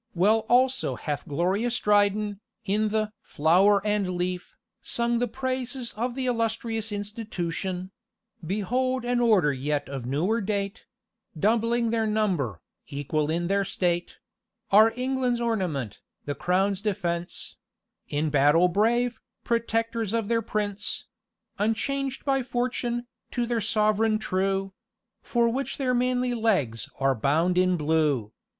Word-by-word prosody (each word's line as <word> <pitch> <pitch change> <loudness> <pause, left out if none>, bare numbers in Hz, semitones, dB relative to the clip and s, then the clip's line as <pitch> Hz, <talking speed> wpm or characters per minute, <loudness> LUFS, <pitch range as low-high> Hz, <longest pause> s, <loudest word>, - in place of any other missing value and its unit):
Well 215 +5 +3
also 255 +1 +3
hath 145 -2 -4
glorious 195 +11 0
Dryden, 205 0 +2 0.3
in 215 +2 +1
the 215 0 -1
"Flower 190 +6 +3
and 210 -2 +1
the - - -2
Leaf," 180 0 -3 0.2
sung 235 0 0
the 245 - +1
praises 255 0 -3
of 240 +3 -2
the 265 -1 -2
illustrious 225 -2 -1
Institution: 190 -3 -4 0.5
"Behold 245 +8 -1
an 245 0 +1
order 205 -11 +4
yet 145 +2 -2
of 135 -3 -5
newer 180 - +1
date, 200 0 -3 0.5
Doubling 230 +3 +2
their 225 -1 +1
number, 180 - 0 0.3
equal 145 +2 -2
in 170 +2 0
their 200 +2 +1
state; 175 -2 -1 0.6
Our 215 +3 +7
England's 255 -1 0
ornament, 180 - -2 0.3
the 145 - -2
crown's 190 +5 +1
defence, 175 -5 -3 0.5
In 150 +1 0
battle 150 +5 +5
brave, 230 +5 +1 0.2
protectors 230 -2 -1
of 225 -2 -1
their 230 -1 +2
prince: 205 -2 -3 0.5
Unchanged 270 +6 -1
by 270 -1 +2
fortune, 240 -1 -2 0.2
to 240 -1 -1
their 235 -1 -1
sovereign 215 +1 +2
true, 195 -1 -1 0.5
For 235 -1 +1
which 265 +4 -3
their 255 -2 +1
manly 250 0 +1
legs 150 - 0
are 135 0 +3
bound 155 +9 +1
with 185 0 +3
blue. 150 -8 +1
210 Hz, 130 wpm, -26 LUFS, 175-235 Hz, 0.6 s, Our